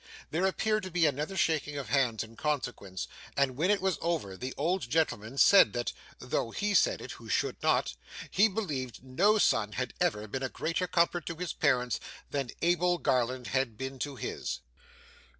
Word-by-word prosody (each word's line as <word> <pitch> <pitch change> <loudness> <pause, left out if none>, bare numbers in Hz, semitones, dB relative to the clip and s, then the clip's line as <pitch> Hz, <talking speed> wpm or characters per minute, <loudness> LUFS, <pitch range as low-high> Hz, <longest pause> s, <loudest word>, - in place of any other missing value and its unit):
There 175 +5 +2
appeared 215 +3 +1
to 185 - -6
be 175 -2 +2
another 150 +6 -1
shaking 150 -4 +1
of 135 -6 -5
hands 125 -4 +2
in 115 0 -13
consequence, 120 - -3 0.3
and 140 -2 +2
when 165 +8 +1
it 205 -1 +4
was 190 -2 0
over, 160 - -1
the 130 +6 -5
old 175 +6 +1
gentleman 135 -6 0
said 190 - +7
that, 120 -1 -2 0.2
though 125 -1 -2
he 205 - -1
said - - +3
it - - -7
who - - -10
should - - 0
not, - - +2 0.4
he 205 +4 +5
believed 150 - -4
no 185 +12 +3
son 110 - +2
had 125 -2 -3
ever 105 +1 +1
been 130 +6 -4
a 130 - -1
greater 165 +6 -1
comfort 170 -1 +1
to 170 - -3
his 180 +1 -4
parents 125 -5 +1 0.3
than 140 -3 -2
Abel 175 +1 +3
Garland 125 -3 0
had 130 -5 0
been 130 +1 -5
to 145 +1 -3
his. 120 - -4
145 Hz, 185 wpm, -30 LUFS, 125-175 Hz, 0.4 s, said